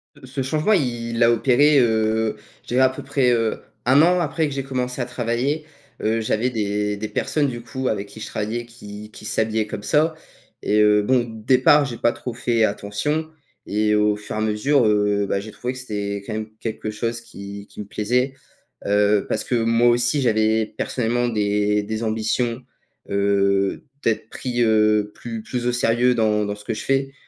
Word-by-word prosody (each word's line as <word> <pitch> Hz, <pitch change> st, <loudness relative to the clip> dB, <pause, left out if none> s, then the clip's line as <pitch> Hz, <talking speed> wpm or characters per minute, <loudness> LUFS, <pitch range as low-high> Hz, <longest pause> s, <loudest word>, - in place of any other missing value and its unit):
Heu, -, -, -14 dB
ce 135 Hz, +1 st, -4 dB
changement, 155 Hz, +10 st, +1 dB
il 120 Hz, -, -1 dB
a 115 Hz, -, +6 dB
opéré, 135 Hz, +5 st, +4 dB
heu, 110 Hz, -2 st, +1 dB, 0.3 s
je -, -, -28 dB
dirais 130 Hz, +1 st, +3 dB
peu -, -, -7 dB
près, 135 Hz, -3 st, +2 dB
heu, 115 Hz, -2 st, +1 dB, 0.3 s
1 135 Hz, +4 st, +6 dB
an 180 Hz, +2 st, +4 dB
après 160 Hz, -1 st, 0 dB
que 140 Hz, -, -5 dB
j'ai 135 Hz, -1 st, -3 dB
commencé 125 Hz, -1 st, -3 dB
à -, -, -1 dB
travailler, 125 Hz, +5 st, -2 dB, 0.4 s
heu, 110 Hz, +1 st, +1 dB
j'avais 110 Hz, +3 st, 0 dB
des 105 Hz, -2 st, -1 dB
des 110 Hz, +1 st, -4 dB
personnes, 150 Hz, -2 st, 0 dB
du 120 Hz, -2 st, -5 dB
coup, 130 Hz, +2 st, -4 dB
avec 100 Hz, -1 st, -2 dB
qui 110 Hz, -, -12 dB
je -, -, -6 dB
travaillais 115 Hz, +3 st, -3 dB
qui 105 Hz, -2 st, -11 dB
qui -, -, -12 dB
s'habillaient 110 Hz, 0 st, 0 dB
comme 105 Hz, -1 st, -6 dB
ça 155 Hz, +8 st, +2 dB, 0.5 s
et 105 Hz, +1 st, +2 dB
heu, 105 Hz, -1 st, +4 dB
bon, 125 Hz, +1 st, +3 dB, 0.2 s
départ, 135 Hz, +3 st, +5 dB
j'ai 120 Hz, -4 st, -5 dB
pas 120 Hz, -, +2 dB
trop 125 Hz, -, -6 dB
fait 115 Hz, -1 st, +1 dB
attention 110 Hz, +10 st, -1 dB, 0.4 s
et 105 Hz, +1 st, +1 dB
au 105 Hz, 0 st, +3 dB
fur 105 Hz, 0 st, -7 dB
et -, -, -2 dB
à -, -, -1 dB
mesure, 110 Hz, +5 st, +2 dB
heu, 105 Hz, -1 st, +2 dB
bah, 100 Hz, -, 0 dB
j'ai 105 Hz, +2 st, -8 dB
trouvé 125 Hz, +4 st, -4 dB
que 130 Hz, -, -8 dB
c'était 100 Hz, -4 st, -4 dB
quand -, -, -5 dB
même 110 Hz, 0 st, -4 dB
quelque 110 Hz, -1 st, -4 dB
chose 115 Hz, +2 st, -3 dB
qui 100 Hz, -3 st, -9 dB
qui -, -, -14 dB
me 105 Hz, -, -5 dB
plaisait, 125 Hz, +6 st, 0 dB, 0.5 s
heu, 105 Hz, 0 st, +3 dB
parce -, -, 0 dB
que 125 Hz, -, -1 dB
moi 115 Hz, +1 st, +3 dB
aussi 120 Hz, +4 st, +2 dB
j'avais 110 Hz, -2 st, +2 dB
personnellement 120 Hz, 0 st, 0 dB
des 105 Hz, -1 st, +1 dB
des 110 Hz, +2 st, -4 dB
ambitions, 115 Hz, +3 st, -1 dB, 0.5 s
heu, 100 Hz, -1 st, +1 dB, 0.2 s
d'être 110 Hz, -1 st, 0 dB
pris, 120 Hz, -2 st, -3 dB
heu, 105 Hz, -1 st, +3 dB
plus 115 Hz, -2 st, -7 dB
plus 120 Hz, +1 st, -3 dB
au -, -, +3 dB
sérieux 120 Hz, +1 st, +2 dB
dans 105 Hz, -2 st, +2 dB
dans 100 Hz, 0 st, -3 dB
ce 105 Hz, -, -13 dB
que -, -, -2 dB
je -, -, -5 dB
fais, 135 Hz, 0 st, 0 dB
115 Hz, 195 wpm, -22 LUFS, 105-125 Hz, 0.5 s, a